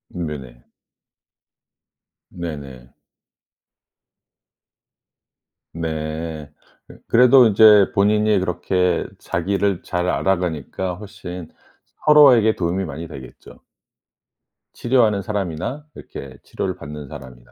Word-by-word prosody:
음 90 Hz, -1 st, -3 dB
네네. 65 Hz, -5 st, -9 dB, 1.7 s
네네. 70 Hz, -7 st, -8 dB, 2.8 s
네. 80 Hz, -1 st, -5 dB, 0.4 s
어 -, -, -12 dB
그래도 125 Hz, +1 st, +6 dB
인제 105 Hz, -1 st, +6 dB
본인이 105 Hz, +1 st, +3 dB
그렇게 90 Hz, 0 st, -1 dB
자기를 100 Hz, +2 st, -1 dB
잘 90 Hz, 0 st, -2 dB
알아가니까 90 Hz, -1 st, -2 dB
훨씬 90 Hz, -4 st, -9 dB, 0.6 s
서로에게 130 Hz, -8 st, +6 dB
도움이 90 Hz, +2 st, -2 dB
많이 80 Hz, +1 st, -7 dB
되겠죠. 65 Hz, -5 st, -13 dB, 1.1 s
치료하는 115 Hz, -5 st, +2 dB
사람이나 100 Hz, -, -4 dB
이렇게 70 Hz, -2 st, -10 dB
치료를 95 Hz, -1 st, -4 dB
받는 75 Hz, -4 st, -9 dB
사람이나. 60 Hz, -2 st, -12 dB
90 Hz, 210 characters per minute, -20 LUFS, 75-105 Hz, 2.8 s, 그래도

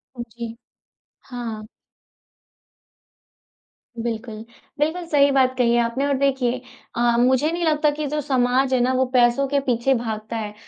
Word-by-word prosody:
उ, 240 Hz, -, -6 dB
जी। 235 Hz, 0 st, -7 dB, 0.7 s
हाँ। 235 Hz, -4 st, -6 dB, 2.4 s
बिल्कुल। 225 Hz, -1 st, -5 dB, 0.4 s
बिल्कुल 320 Hz, +4 st, -1 dB
सही 285 Hz, -2 st, +4 dB
बात 260 Hz, -1 st, +2 dB
कही 240 Hz, -2 st, +3 dB
है 240 Hz, -, +3 dB
आपने 235 Hz, +4 st, -1 dB
और 280 Hz, -1 st, +1 dB
देखिए, 260 Hz, -2 st, 0 dB, 0.3 s
अ, -, -, -3 dB, 0.2 s
मुझे 260 Hz, +5 st, +3 dB
नहीं 345 Hz, +1 st, -3 dB
लगता 305 Hz, -1 st, +2 dB
कि 300 Hz, +1 st, -4 dB
जो 300 Hz, +2 st, -2 dB
समाज 260 Hz, 0 st, +1 dB
है 255 Hz, -, +3 dB
ना 250 Hz, +2 st, +2 dB
वह 260 Hz, 0 st, +2 dB
पैसों 245 Hz, +2 st, +3 dB
के 285 Hz, +1 st, +1 dB
पीछे 260 Hz, -1 st, +1 dB
भागता 225 Hz, -2 st, -4 dB
है। 210 Hz, -2 st, -5 dB
255 Hz, 150 wpm, -22 LUFS, 235-280 Hz, 2.4 s, सही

